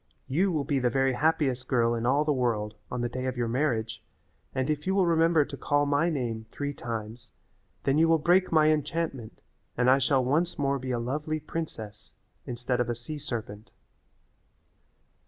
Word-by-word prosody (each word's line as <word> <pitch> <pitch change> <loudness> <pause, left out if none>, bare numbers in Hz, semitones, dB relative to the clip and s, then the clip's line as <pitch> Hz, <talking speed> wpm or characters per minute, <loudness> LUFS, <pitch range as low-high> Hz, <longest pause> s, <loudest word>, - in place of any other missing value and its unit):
You 180 +8 +1
will 155 -4 0
be 140 -2 0
the 125 -1 +2
very 135 0 +2
happiest 130 -2 +1
girl 120 -2 +2
in 115 0 -1
all 145 +4 +3
the 150 - +2
world 115 -5 -1 0.2
on 125 - -3
the 120 - 0
day 130 +2 -4
of 130 - -3
your 120 -1 0
marriage, 115 -4 -1 0.5
and 130 0 -1
if 150 +2 -2
you 190 - +2
will 195 -2 +4
remember 165 -2 +4
to 145 - -7
call 145 +1 +1
my 145 +4 +2
name 115 -7 -3
three 145 0 -3
times 115 -1 -6 0.5
then 140 +2 +2
you 165 - +5
will 165 0 +5
break 180 +4 +3
my 155 -1 +5
enchantment 150 -5 -3 0.4
and 125 +1 +4
I 135 - +5
shall 130 -1 +2
once 165 +8 +1
more 140 -2 0
be 130 0 -6
a 125 - 0
lovely 150 +6 -2
princess 110 -11 -7 0.3
instead 125 +1 -2
of 120 -1 0
a 120 - -1
sea 135 +6 -7
serpent." 110 -6 -6
135 Hz, 190 wpm, -28 LUFS, 120-155 Hz, 0.5 s, you